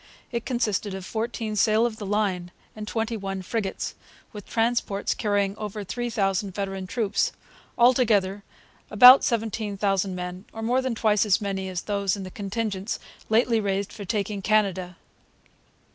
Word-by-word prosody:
It 235 -2 -3
consisted 215 -5 -1
of 190 -1 -7
fourteen 220 0 -3
sail 215 +2 +3
of 230 -2 -2
the 205 - -6
line 195 -4 0 0.3
and 215 -1 -7
twenty 225 +1 -2
one 195 -2 -4
frigates, 200 0 -3 0.4
with 210 -2 -9
transports 225 -3 0
carrying 205 -2 0
over 210 -1 -5
three 240 +5 -3
thousand 195 -3 -1
veteran 195 -2 -3
troops; 215 0 0 0.5
altogether, 220 -6 +3 0.5
about 250 +5 +9
17,000 205 -4 0
men, 180 +2 -6
or 225 - -6
more 250 +3 +2
than 260 -3 -2
twice 215 -2 +3
as 205 -2 +3
many 195 -2 -3
as 180 -1 -4
those 200 -1 0
in 195 - -6
the 185 - -8
contingents 205 0 -3 0.3
lately 230 +1 +3
raised 200 -1 -2
for 205 - -7
taking 200 0 -2
Canada. 190 -4 +1
205 Hz, 150 wpm, -25 LUFS, 195-225 Hz, 0.5 s, about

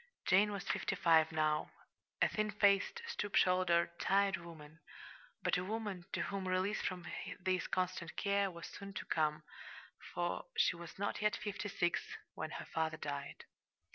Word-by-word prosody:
Jane 205 +3 +5
was 200 -2 -3
fifty - - 0
five 160 -2 +5
now, 155 -1 +1 0.5
a - - +6
thin 215 0 -1
faced, 205 - +3
stoop 205 - -3
shouldered, 180 -2 +4
tired 195 -1 +3
woman 165 -2 -11 0.6
but - - +3
a - - -2
woman 205 -3 -3
to - - 0
whom 195 -1 -3
release 185 +3 +1
from 180 -2 -3 0.3
this 185 0 0
constant 185 -2 -2
care 200 -1 +2
was 170 -3 -8
soon 200 -1 -8
to - - -4
come, 155 -1 +1 0.7
for - - -1
she 320 - +4
was 170 -1 -9
not 200 +1 -2
yet 210 0 +3
fifty 205 0 -4
six 175 -4 +1 0.3
when - - -4
her - - -6
father 160 -1 -1
died. 145 -2 -5
185 Hz, 160 wpm, -36 LUFS, 165-200 Hz, 0.7 s, a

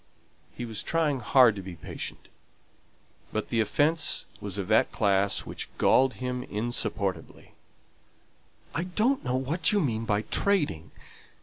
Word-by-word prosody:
He 120 - -4
was 110 -3 -2
trying 155 -5 0
hard 125 -1 +5
to 100 - -6
be 95 -2 -8
patient; 80 - -7 1.0
but 110 - -3
the 115 - 0
offence 145 +8 +2
was 100 -1 -4
of 100 - -3
that 110 +1 +3
class 100 -1 +1
which - - -5
galled 130 -3 +4
him 125 +3 -3
insupportably. 105 -6 -3 1.2
"I 170 - -2
don't 220 +9 +1
know 125 0 -1
what 150 +5 +1
you 210 - +3
mean 115 - -1
by 105 -1 0
trading. 145 - 0
120 Hz, 135 wpm, -27 LUFS, 105-150 Hz, 1.2 s, hard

